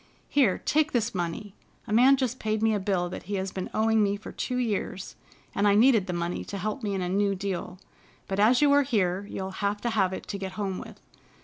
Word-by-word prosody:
Here, 255 -10 +3
take 305 0 +1
this 235 -1 0
money. 185 +3 -4 0.3
A 210 - -4
man 260 +4 +6
just 255 -1 -2
paid 215 0 -1
me 225 0 +3
a 210 - 0
bill 190 -2 0
that 180 - -6
he 205 - -1
has 190 0 -2
been 185 - -5
owing 220 0 +2
me 200 0 +1
for 210 - -9
two 250 - -3
years, 205 -5 -2 0.4
and 200 +1 +2
I 200 - +5
needed 220 -3 +5
the - - -2
money 175 0 -2
to 200 - -6
help 215 +7 -3
me 205 -3 -2
in 190 - -2
a - - -2
new 200 +2 +1
deal, 190 -1 -4 0.5
but 195 +1 -2
as 245 +6 +5
you 290 - +5
are 285 0 +6
here 200 -7 0
you'll 190 0 -4
have 205 0 0
to 235 - -1
have 195 -4 +2
it 185 - -6
to 200 - -4
get 190 -1 -5
home 195 -3 -3
with. - - -11
205 Hz, 240 wpm, -27 LUFS, 190-225 Hz, 0.5 s, man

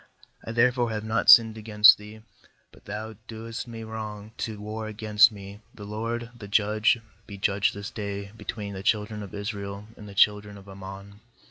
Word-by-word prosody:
27I 115 - -5
therefore 120 0 +3
have 110 -1 -3
not 110 +1 0
sinned 110 -1 +8
against 105 -1 +7
thee, 105 +1 -12 0.5
but - - -20
thou 110 +2 -6
doest 115 +2 -7
me 115 -1 -8
wrong 110 -1 -7
to 110 -3 -4
war 110 +1 -5
against 110 +1 +4
me; 100 0 -10 0.2
the 105 - -10
LORD, 115 +3 -4
the 110 -4 -10
Judge, 110 +3 +3 0.3
be 100 - -8
judge 100 +1 +1
this 100 +4 -7
day 100 -3 -5
between 105 -2 -6
the 95 - -6
children 105 0 0
of 100 -1 -8
Israel 100 -1 -5
and 105 -1 -11
the 100 - -11
children 105 0 +3
of 100 0 -15
Ammon.' 100 +1 -10
105 Hz, 175 wpm, -26 LUFS, 100-110 Hz, 0.5 s, sinned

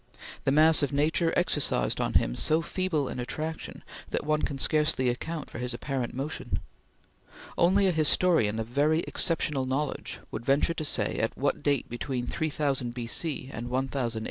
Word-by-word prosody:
The 135 - +3
mass 155 +3 +6
of 145 - 0
nature 160 +4 +2
exercised 140 - +2
on - - -1
him - - +3
so 155 - +1
feeble 170 -5 -1
an 125 - -5
attraction 155 +6 -5 0.3
that - - -2
one 155 0 +1
can 140 - -2
scarcely 150 -3 +2
account 150 +5 -4
for - - -7
his 125 0 -1
apparent 130 -2 -3
motion. 135 +1 -3 1.0
Only 190 +3 +4
a 190 - +4
historian 155 -8 +3
of 110 - -2
very 145 +7 +2
exceptional 150 -7 0
knowledge 140 +3 -2
would 110 - -5
venture 140 +6 +2
to 160 - -4
say 105 -7 -1
at 115 - -1
what 140 +2 0
date 145 -3 +1
between 120 +1 -3
3000 140 -4 -1
B.C. 130 +3 -3
and 120 +1 -5
1000 130 -2 -1
A.D. - - -1
140 Hz, 170 wpm, -28 LUFS, 125-155 Hz, 1.0 s, mass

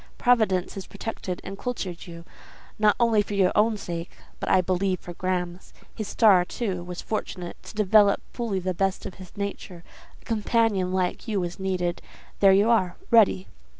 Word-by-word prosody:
Providence 220 -7 +2
has 195 -1 -7
protected 190 -5 -5
and 195 - -8
cultured 190 -9 -4
you, 170 0 -10 0.5
not 210 -1 +4
only 230 -3 +4
for 205 0 -4
your 190 -2 +3
own 215 +1 +3
sake, 170 -3 -5 0.3
but - - -3
I 190 - +5
believe 185 +1 0
for 175 - -9
Graham's. 180 0 -3 0.2
His 215 - -5
star, 200 -6 +5
too, 185 -2 -3
was 175 0 -7
fortunate: 180 -5 -4
to - - -12
develop 210 -1 +4
fully 230 -5 -2
the 185 0 -2
best 195 +2 -1
of 195 - -6
his 185 - -13
nature, 200 -3 -5 0.4
a - - -25
companion 220 -4 +1
like 185 +4 -1
you 210 -3 0
was 175 +1 -4
needed: 180 -2 -2 0.4
there 195 -1 +6
you 200 +3 +4
are, 185 -6 +2 0.2
ready. 200 - +5
190 Hz, 175 wpm, -25 LUFS, 180-215 Hz, 0.5 s, there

